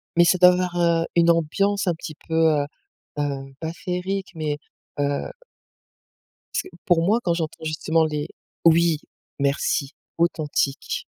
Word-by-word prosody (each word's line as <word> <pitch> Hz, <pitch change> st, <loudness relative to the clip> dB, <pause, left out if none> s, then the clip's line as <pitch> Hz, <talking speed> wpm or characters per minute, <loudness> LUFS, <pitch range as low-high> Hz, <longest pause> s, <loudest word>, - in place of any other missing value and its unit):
Mais 175 Hz, -, +6 dB
ça 185 Hz, -, +4 dB
doit 180 Hz, 0 st, +8 dB
avoir, 180 Hz, -1 st, -1 dB
heu, 170 Hz, -1 st, +3 dB
une 170 Hz, 0 st, +5 dB
ambiance 195 Hz, +5 st, +1 dB
un 175 Hz, -, +3 dB
petit 160 Hz, -1 st, -8 dB
peu, 160 Hz, -, -5 dB
heu, 155 Hz, -3 st, +3 dB, 0.5 s
heu, 135 Hz, -2 st, -3 dB
pas 160 Hz, 0 st, -4 dB
féerique, 185 Hz, +2 st, -3 dB
mais 150 Hz, -2 st, -2 dB, 0.4 s
heu 145 Hz, -, -1 dB, 1.2 s
parce -, -, 0 dB
que -, -, -11 dB, 0.2 s
pour 170 Hz, -2 st, +4 dB
moi 215 Hz, +6 st, +3 dB
quand 170 Hz, -, +2 dB
j'entends 160 Hz, -1 st, -4 dB
justement 160 Hz, +1 st, +1 dB
les 150 Hz, 0 st, -2 dB, 0.4 s
oui, 165 Hz, -1 st, +5 dB, 0.4 s
merci, 140 Hz, 0 st, 0 dB, 0.2 s
authentique. 155 Hz, -4 st, 0 dB
165 Hz, 145 wpm, -23 LUFS, 150-175 Hz, 1.2 s, doit